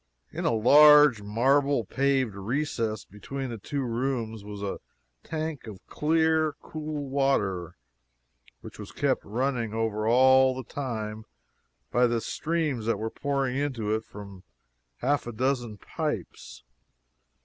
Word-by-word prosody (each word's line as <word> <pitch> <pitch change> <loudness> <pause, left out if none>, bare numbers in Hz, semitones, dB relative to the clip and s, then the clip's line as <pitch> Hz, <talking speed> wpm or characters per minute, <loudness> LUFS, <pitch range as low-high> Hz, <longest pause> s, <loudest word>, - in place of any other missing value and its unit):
In - - -4
a - - +3
large 145 +2 +7
marble 130 +4 +2
paved 135 -1 +1
recess 115 +1 -2
between 130 +6 -6
the 115 - -6
two 140 +7 -3
rooms 115 -3 -2
was 105 0 -8
a 100 - -3 0.4
tank 155 -5 -4
of 100 -4 -9
clear, 160 -1 +1
cool 155 -2 -6
water, 100 - 0 0.9
which - - -11
was - - -8
kept - - 0
running 120 0 -2
over 110 -1 -1
all 130 +2 +5
the 130 - -5
time 110 -5 -5 0.7
by 125 0 +4
the 120 -1 0
streams 150 -4 -2
that 115 - +1
were 110 +1 -4
pouring 140 -3 -1
into 130 -7 -1
it 110 +1 -1
from 100 -3 -11 0.6
half 140 0 0
a - - -3
dozen 120 -2 -1
pipes. - - -5
125 Hz, 130 wpm, -27 LUFS, 110-140 Hz, 0.9 s, large